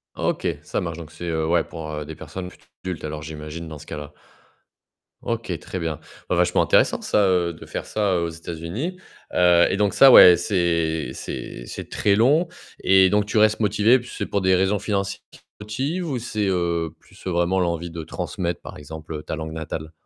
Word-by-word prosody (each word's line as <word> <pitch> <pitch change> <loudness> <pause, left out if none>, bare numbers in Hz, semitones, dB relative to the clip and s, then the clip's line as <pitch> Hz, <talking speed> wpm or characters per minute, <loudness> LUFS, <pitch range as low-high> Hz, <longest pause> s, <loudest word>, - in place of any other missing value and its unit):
OK, - - -1 0.2
ça - - -2
marche 85 -2 -4
donc 80 -2 -9
c'est, 85 +3 -8
heu, 80 -1 0
ouais 85 0 +3
pour, 80 -2 -8
heu, 75 -1 -4
des 80 - -8
personnes 90 +2 -7
plutôt - - -20 0.2
adultes 90 -3 -5
alors 75 0 -5
j'imagine 80 +1 -7
dans 80 -1 -8
ce 75 - -12
cas-là. 75 -1 -7 1.1
OK, - - -2
très 95 - -6
bien. 80 -3 -3 0.3
Vachement - - +3
intéressant - - +3
ça, 100 -2 +2
heu, 90 -2 +2
de - - -12
faire - - -5
ça 100 -5 0
aux 85 - -1
États-Unis. 85 - -5 0.4
Heu 90 -1 +5
et - - 0
donc 100 -1 +1
ça 135 -1 +8
ouais, 90 -1 +10
c'est 85 -4 0
c'est - - -7
c'est - - -8
très 100 -1 +2
long 145 - +4 0.4
et 95 0 +6
donc 105 0 +2
tu 110 +2 -2
restes 110 +1 +4
motivée, 105 +4 +4
puis 120 - -11
c'est - - -2
pour 100 - -1
des 95 0 +4
raisons 95 +2 +2
financières 100 -2 -2
qui - - -16
te - - -37 0.2
motives 140 - -3
ou 130 - -2
c'est, 110 -3 -2
heu, 85 -3 0
plus, 95 - -19
heu, 95 - 0
vraiment 85 +2 +1
l'envie 85 -1 -1
de 80 -1 -6
transmettre 85 +2 -4
par - - -9
exemple, 80 +2 -8
heu, 75 - -5
ta - - -4
langue 80 0 -5
natale? 80 0 -5
85 Hz, 205 wpm, -23 LUFS, 80-100 Hz, 1.1 s, ouais